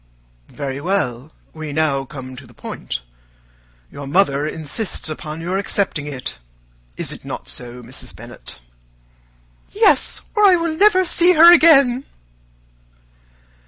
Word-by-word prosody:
"Very 140 -1 -5
well. 150 -7 -2 0.2
We 155 -2 -7
now 140 -3 0
come 130 -1 -9
to 130 0 -12
the 120 - -19
point. - - -6 0.9
Your 140 -1 -8
mother 145 -3 +1
insists 160 +4 -4
upon 155 +1 -6
your 180 +3 -2
accepting 195 -7 -2
it. 130 - -5 0.6
Is - - -3
it - - -9
not - - -7
so, 125 0 -6
Mrs. 125 +3 -7
Bennet?" - - -11 1.1
"Yes, 420 0 +3
or 425 - +2
I 385 -3 +7
will 335 -2 -1
never 375 0 +4
see 350 +1 +4
her 340 +1 +9
again." 275 -7 +5
160 Hz, 125 wpm, -19 LUFS, -, 1.1 s, her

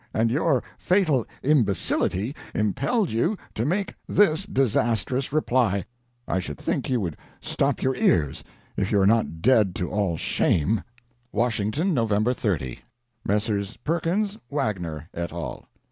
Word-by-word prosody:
And 115 +1 +2
your 145 -2 +2 0.2
fatal 165 - +2 0.2
imbecility 115 -3 +1 0.2
impelled 140 - +1
you 165 - +1 0.2
to 115 +4 -1
make 195 +5 0 0.2
this 195 -1 +3
disastrous 125 +1 +1
reply. 120 - +1 0.4
I 95 - 0
should 75 -6 -5
think - - -2
you 125 -2 +2
would 85 -5 -3 0.2
stop - - -1
your 130 0 +1
ears, 75 - +2 0.3
if - - -1
you 100 - +4
are 95 - +4
not 100 -6 +2
dead 110 -7 +4
to 90 - -3
all 100 -5 0
shame: 90 +8 +1 0.5
"'WASHINGTON, 120 - 0
Nov. 115 -6 +1 0.2
30. 80 - -2 0.5
"'Messrs. 105 0 -1
Perkins, 180 +6 -1
Wagner, 90 - -2
et 85 0 -4
al. 85 -1 -6
115 Hz, 130 wpm, -25 LUFS, 95-145 Hz, 0.5 s, you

